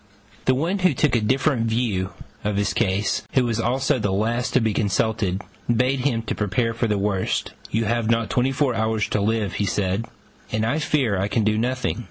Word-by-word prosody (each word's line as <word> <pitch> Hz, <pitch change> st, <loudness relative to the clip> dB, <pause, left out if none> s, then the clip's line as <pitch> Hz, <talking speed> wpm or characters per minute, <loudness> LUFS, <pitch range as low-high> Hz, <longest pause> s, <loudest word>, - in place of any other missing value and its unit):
The 130 Hz, -, +4 dB
one 170 Hz, +9 st, 0 dB
who 185 Hz, -1 st, +3 dB
took 150 Hz, -4 st, +2 dB
a 115 Hz, -, +2 dB
different 130 Hz, +1 st, +1 dB
view 110 Hz, -5 st, 0 dB, 0.3 s
of 105 Hz, 0 st, -1 dB
his 100 Hz, 0 st, +1 dB
case, 105 Hz, -2 st, +1 dB
who 130 Hz, -2 st, +3 dB
was 115 Hz, -1 st, -1 dB
also 130 Hz, +4 st, +1 dB
the 105 Hz, -3 st, 0 dB
last 115 Hz, +5 st, 0 dB
to -, -, +6 dB
be 110 Hz, -3 st, +1 dB
consulted, 105 Hz, -2 st, 0 dB, 0.3 s
bade 125 Hz, +3 st, +2 dB
him 125 Hz, -4 st, 0 dB
prepare 115 Hz, +2 st, -1 dB
for 115 Hz, +1 st, 0 dB
the 105 Hz, -1 st, +1 dB
worst: 100 Hz, -1 st, -1 dB, 0.2 s
"You 115 Hz, +1 st, 0 dB
have 115 Hz, +1 st, 0 dB
not 115 Hz, -2 st, +1 dB
twenty 130 Hz, +2 st, +2 dB
four 135 Hz, -1 st, +1 dB
hours 110 Hz, -1 st, 0 dB
to 105 Hz, -, 0 dB
live," 105 Hz, -2 st, 0 dB
said 100 Hz, +3 st, -1 dB, 0.4 s
he, 110 Hz, -, -2 dB
"and 110 Hz, -, +1 dB
I 140 Hz, +7 st, +1 dB
fear 130 Hz, -10 st, +1 dB
I 100 Hz, -, 0 dB
can 110 Hz, +1 st, +1 dB
do 105 Hz, +1 st, +2 dB
nothing." 125 Hz, +2 st, -1 dB
115 Hz, 205 wpm, -23 LUFS, 105-125 Hz, 0.4 s, to